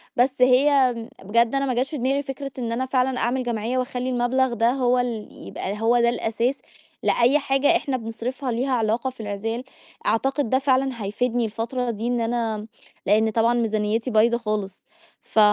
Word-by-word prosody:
بس 255 +1 +1
هي 260 0 +5 0.3
بجد 235 +5 +2
أنا 275 0 +1
ما 260 - 0
جاش 250 +3 0
في 305 - -4
دماغي 270 +2 0
فكرة 275 0 -6
إن 235 -2 -3
أنا 245 +3 -1
فعلًا 260 0 0
أعمل 255 +2 0
جمعية 235 +1 -2
واخلّي 250 0 -2
المبلغ 250 +1 +1
ده 230 +1 +2
هو 250 -1 +2
ال 235 -4 -2 0.2
يبقى 205 +3 -5
هو 235 +2 +3
ده 235 0 +4
الأساس 235 +2 -1 0.5
لأي 245 +5 +3
حاجة 270 0 +2
إحنا 270 -2 -2
بنصرفها 240 +3 -4
ليها 250 +4 -1
علاقة 230 +2 0
في 255 - -16
العزال. 220 +3 -3 0.4
أعتقد 270 +4 +1
ده 260 - +3
فعلًا 265 -3 0
هيفيدني 240 +4 0
الفترة 235 +3 -3
دي 225 +1 -4
إن 245 -1 0
أنا 225 -2 -2 0.4
لإن 215 +2 +3
طبعًا 230 +2 +2
ميزانيتي 225 +1 0
بايظة 230 +2 +4
خالص 210 -4 -4 0.4
ف - - -1
240 Hz, 175 wpm, -23 LUFS, 225-260 Hz, 0.5 s, هي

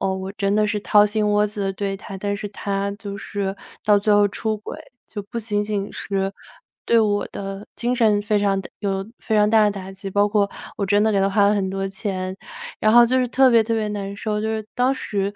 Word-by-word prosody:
呃， 190 -1 0
我 190 0 -5
真 200 0 0
的 215 0 +3
是 210 0 -1
掏 210 0 +5
心 210 0 0
窝 210 0 +3
子 205 0 -7
地 195 - -1
对 195 0 -3
他， 195 0 -9
但 200 +1 -2
是 205 0 -5
他 200 0 -2
就 200 -1 -7
是 195 -1 -3 0.3
到 210 -1 +5
最 210 +1 +2
后 205 0 +5
出 220 +2 -2
轨， 215 - -8 0.3
就 210 - -5
不 235 - -6
仅 205 -1 -1
仅 205 -1 -3
是 195 -1 -2 0.5
对 230 - +4
我 205 -2 +1
的 195 +1 -6
精 245 +1 0
神 220 -4 +3
非 210 +1 0
常 195 -1 +1
打 - - -10
有 195 -1 -2
非 220 - -2
常 210 0 +4
大 220 0 +5
的 210 - +3
打 195 -2 -7
击 195 0 -7
包 205 +1 +3
括 205 -1 +1 0.3
我 200 - -1
真 205 +1 +3
的 220 0 +2
给 195 - +2
他 195 0 +2
花 200 0 +4
了 210 - +3
很 190 -2 -1
多 195 0 -2
钱， 190 -1 -4 0.4
然 215 0 +3
后 240 0 +8
就 260 +2 +2
是 255 - +2
特 260 +2 +4
别 230 -2 +5
特 230 - -2
别 215 -1 -1
难 200 -1 -4
受。 210 +1 -2
就 - - -1
是 220 0 -2
当 250 +2 +2
时 200 -6 -2
205 Hz, 265 characters per minute, -22 LUFS, 195-215 Hz, 0.5 s, 后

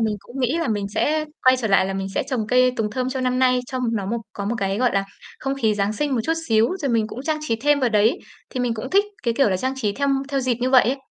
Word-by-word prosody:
mình 220 -2 0
cũng 255 +5 -8
nghĩ 260 +7 +1
là 330 - -1
mình 205 -2 -1
sẽ 305 +8 0 0.2
quay 255 0 +7
trở 235 -3 -2
lại 195 -1 +4
là 195 - -3
mình 195 0 -3
sẽ - - +1
trồng 245 -6 -3
cây 250 +2 +4
tùng 210 -1 -1
thơm 255 +3 -2
cho 260 0 -3
năm 255 0 0
nay 255 -1 +3
cho 260 - -4
m 250 -2 -1
nó 200 -2 -3
một 235 +4 -1
có 200 - -5
một 215 +4 -1
cái, 195 0 -1
gọi 250 0 +2
là, 195 0 +1 0.3
không 270 0 -2
khí 225 -6 +1
Giáng 205 0 0
sinh 280 +5 -1
một 240 - +1
chút 325 - +1 0.2
xíu 225 0 +4
rồi 290 -6 -2
mình 225 -2 +2
cũng 240 +4 -7
trang 310 +1 -1
trí 225 - +1
thêm 285 +5 +2
vào 255 - +3
đấy 215 0 +3 0.3
thì 255 - -3
mình 245 -2 0
cũng 230 +4 -6
thích 400 +1 +4 0.2
cái 235 -2 0
kiểu 275 -4 +3
là 185 - +1
trang 260 +8 -2
trí 215 -6 -1
theo 280 +6 -1 0.2
theo 275 -1 0
dịp 255 -1 +1
như 255 +1 0
vậy 255 -2 +7
ấy. 255 +4 0
245 Hz, 315 wpm, -22 LUFS, 215-260 Hz, 0.3 s, quay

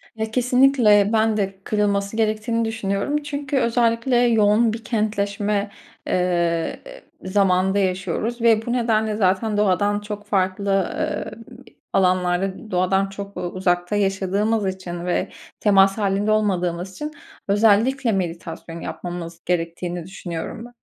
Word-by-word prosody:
Ya 220 0 -3
kesinlikle 250 -4 +4
ben 220 -1 +2
de 195 -1 -2
kırılması 200 0 0
gerektiğini 225 +1 0
düşünüyorum. 225 +6 -2
Çünkü 290 0 -3
özellikle 235 0 +1
yoğun 225 -1 +3
bir 225 - -7
kentleşme, 205 -2 -1 0.4
eee, 170 -2 0 0.5
ı - - -5
zamanında 190 0 +2
yaşıyoruz 195 +5 -2
ve 225 -1 +3
bu 240 - -1
nedenle 220 -3 +1
zaten 205 +2 +1
doğadan 205 0 +2
çok 205 0 -7
farklı, 195 -1 0
eee, - - -2 0.6
alanlarda 185 +2 +1
doğadan 190 +2 +1
çok, 200 0 -8
eee, 180 - -4
uzakta 175 +1 -1
yaşadığımız 200 +2 0
için 180 -2 -5
ve 180 - -1 0.3
temas 195 -1 +4
hâlinde 205 +1 +1
olmadığımız 185 -4 0
için 300 +9 -5 0.4
özellikle 225 +5 +3
meditasyon 170 -2 -4
yapmamız 170 -1 -6
gerektiğini 175 0 -2
düşünüyorum 185 +3 -6
be - - -11
200 Hz, 120 wpm, -22 LUFS, 185-220 Hz, 0.6 s, kesinlikle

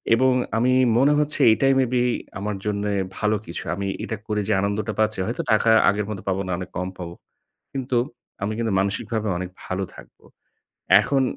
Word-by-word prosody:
এবং 130 +2 +3 0.2
আমি 125 +3 +3 0.2
মনে 140 +4 +5
হচ্ছে 150 0 -1
এইটাই 135 +5 +3
মেবি 125 -1 +2 0.4
আমার 105 +1 -3
জন্যে 105 0 -1 0.2
ভালো 105 0 +1
কিছু। 85 - -6
আমি 100 +1 -3 0.2
এটা 115 - -4
করে 105 -1 0
যে 110 - +2
আনন্দটা 100 +1 -1
পাচ্ছি, 110 -2 +1
হয়তো 120 +8 -2
টাকা 110 +1 +4 0.2
আগের 105 +1 0
মতো 100 -3 -5
পাবো 95 0 0
না, - - -3
অনেক 90 - -6
কম 90 +1 -2
পাবো। 85 -2 -6 0.6
কিন্তু 130 -2 -1 0.5
আমি 105 +2 -1
কিন্তু 115 -2 -1
মানসিকভাবে 105 +3 -1
অনেক 90 0 -4 0.2
ভালো 95 +1 -2
থাকব। - - -15 0.8
এখন 135 -1 +1
110 Hz, 175 wpm, -23 LUFS, 100-120 Hz, 0.8 s, মনে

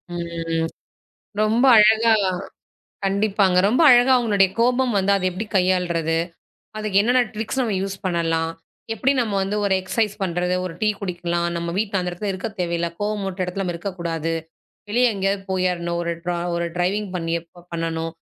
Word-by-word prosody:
ம். 165 -1 -2 0.7
ரொம்ப 225 +4 +3
அழகா 220 +2 +6 0.9
கண்டிப்பாங்க. 195 -1 +2
ரொம்ப 245 +10 +3
அழகா 245 +1 +6
உங்களுடைய 200 -5 +3
கோபம் 250 0 +2
வந்து 195 +1 +2
அதை 185 -1 -1
எப்பபிடி 200 +5 -5
கையாள்றது, 175 -3 +1 0.6
அதுக்கு 215 -2 +1
என்னென்ன 245 +3 +3
ட்ரிக்ஸ் 225 +5 -2
நம்ம 225 -5 0
யூஸ் 195 0 -4
பண்ணலாம். 165 -2 0 0.4
எப்பபிடி 265 +6 +2
நம்ம 215 -4 -1
வந்து 200 +2 -2
ஒரு 195 -1 +2
எக்ஸ்சைஸ் 210 +2 -1
பண்றது, 180 0 0
ஒரு 180 -3 -5
டீ 215 - +2
குடிக்கலாம், 175 -2 -2
நம்ம 170 0 -3
வீட்டு 200 -2 0
அந்த 180 0 -2
இடத்துல 195 +3 -4
இருக்க 190 +3 -4
தேவையில்ல, 170 -1 -1
கோபம் 210 0 -1
மூட்ற 190 0 -5
இடத்துல 180 +2 -3
நம்ம 175 -2 -2
இருக்கக்கூடாது, 170 -3 -3 0.6
வெளிய 240 +2 +3
எங்கேயாவது 195 0 -1
போயிர்ணும். 175 -2 -1
ஒரு 170 0 -1
ட்ரா 175 -1 -1 0.4
டிரைவிங் 195 +3 0
பண்ணி 165 -1 -2
எப்ப 170 +1 -19
பண்ணணும், 165 -1 -2
190 Hz, 155 wpm, -22 LUFS, 170-210 Hz, 0.9 s, அழகா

